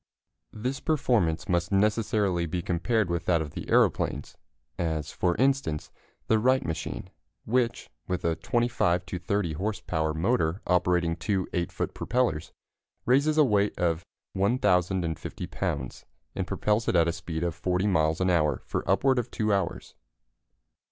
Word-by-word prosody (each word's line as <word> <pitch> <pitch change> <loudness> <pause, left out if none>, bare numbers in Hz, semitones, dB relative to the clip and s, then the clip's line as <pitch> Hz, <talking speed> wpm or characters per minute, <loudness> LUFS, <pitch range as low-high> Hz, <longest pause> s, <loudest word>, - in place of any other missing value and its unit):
] - - -55
This 135 +2 -1
performance 110 - +1
must 85 -1 0
necessarily 100 -3 +1
be 85 +2 -3
compared 105 +5 +1
with 85 -1 -2
that 85 -2 +3
of 75 -2 -4
the - - -7
aeroplanes, - - +1 0.4
as, 80 -4 -2
for 90 -1 0
instance, 135 - 0 0.3
the 110 - +3
Wright 130 +3 +3
machine, 80 - -4 0.3
which, 120 +1 0 0.2
with 90 -2 -2
a 85 -1 +2
25 120 -8 +1
to 90 - -5
30 90 -2 -1
horse 100 +7 -2
power 80 -1 -1
motor 85 -1 +1
operating 90 -2 +2
two 95 +1 -1
8 85 -2 -1
foot - - -3
propellers, 120 -11 -1 0.5
raises 140 +5 +3
a 155 - +7
weight 105 -5 +2
of 85 -1 0 0.3
1,050 95 - 0
pounds 65 -3 -4 0.3
and - - -3
propels 105 +2 0
it - - +1
at 85 -1 +4
a - - +2
speed 80 -1 -4
of 85 -2 0
40 90 +3 -1
miles 80 -5 +2
an 95 0 +2
hour 75 -6 +1
for - - -2
upward 130 +7 +3
of 120 0 -3
2 110 -3 0
hours. 95 -3 -2
90 Hz, 155 wpm, -27 LUFS, 85-110 Hz, 0.5 s, a